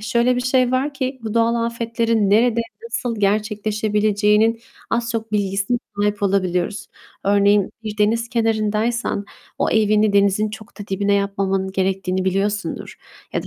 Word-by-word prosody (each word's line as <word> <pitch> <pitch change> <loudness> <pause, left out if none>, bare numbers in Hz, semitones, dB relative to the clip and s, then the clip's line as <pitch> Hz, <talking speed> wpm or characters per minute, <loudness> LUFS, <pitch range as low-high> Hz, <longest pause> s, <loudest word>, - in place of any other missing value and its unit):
Şöyle 235 +3 +1
bir - - 0
şey 255 0 +2
var 275 +3 0
ki, 260 -1 -3
bu 220 0 -4
doğal 230 0 +3
afetlerin 230 -2 0
nerede, 230 +2 +3 0.2
nasıl 245 - -3
gerçekleşebileceğinin 210 +1 +1 0.3
az, 235 0 0
çok 225 -1 -4
bilgisine 200 +3 0 0.2
sahip 205 0 0
olabiliyoruz. 185 -1 0 0.4
Örneğin, 200 0 +3
bir 215 -1 -6
deniz 230 +3 +1
kenarındaysan 225 -1 0 0.3
o - - +1
evini 215 -1 +3
denizin 200 +1 +2
çok 220 0 -11
da 205 - -7
dibine 200 +1 +1
yapmamanın 195 -1 -1
gerektiğini 190 -1 -1
biliyorsundur. 200 +2 -2 0.4
Ya - - -1
da, - - -10
210 Hz, 140 wpm, -20 LUFS, 200-230 Hz, 0.4 s, doğal